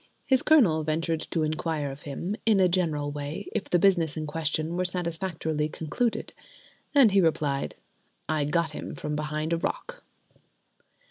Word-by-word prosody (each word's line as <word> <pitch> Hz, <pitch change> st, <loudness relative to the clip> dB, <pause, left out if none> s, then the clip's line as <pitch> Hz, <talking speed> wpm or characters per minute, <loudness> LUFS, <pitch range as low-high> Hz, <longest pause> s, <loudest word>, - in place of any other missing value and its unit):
His 265 Hz, -2 st, +4 dB
Colonel 205 Hz, -, +4 dB
ventured 160 Hz, +1 st, 0 dB
to 165 Hz, -, 0 dB
inquire 155 Hz, -2 st, -1 dB
of 135 Hz, +1 st, -10 dB
him, 175 Hz, +8 st, -3 dB
in 220 Hz, -3 st, +4 dB
a 185 Hz, -, +6 dB
general 160 Hz, -5 st, 0 dB
way, 145 Hz, +6 st, -5 dB
if 215 Hz, -3 st, -2 dB
the 175 Hz, -, +4 dB
business 170 Hz, -4 st, +3 dB
in 155 Hz, -, -2 dB
question 155 Hz, +1 st, -1 dB
were 180 Hz, -, 0 dB
satisfactorily 170 Hz, -3 st, -2 dB
concluded. 165 Hz, +11 st, -2 dB, 0.6 s
And 260 Hz, -7 st, +7 dB
he 195 Hz, 0 st, +5 dB
replied: 150 Hz, -4 st, 0 dB, 0.5 s
"I 155 Hz, -2 st, +1 dB
got 160 Hz, +1 st, +1 dB
him -, -, -6 dB
from 150 Hz, 0 st, -4 dB
behind 155 Hz, +2 st, -2 dB
a -, -, +2 dB
rock." -, -, -4 dB
160 Hz, 155 wpm, -27 LUFS, 150-185 Hz, 0.6 s, And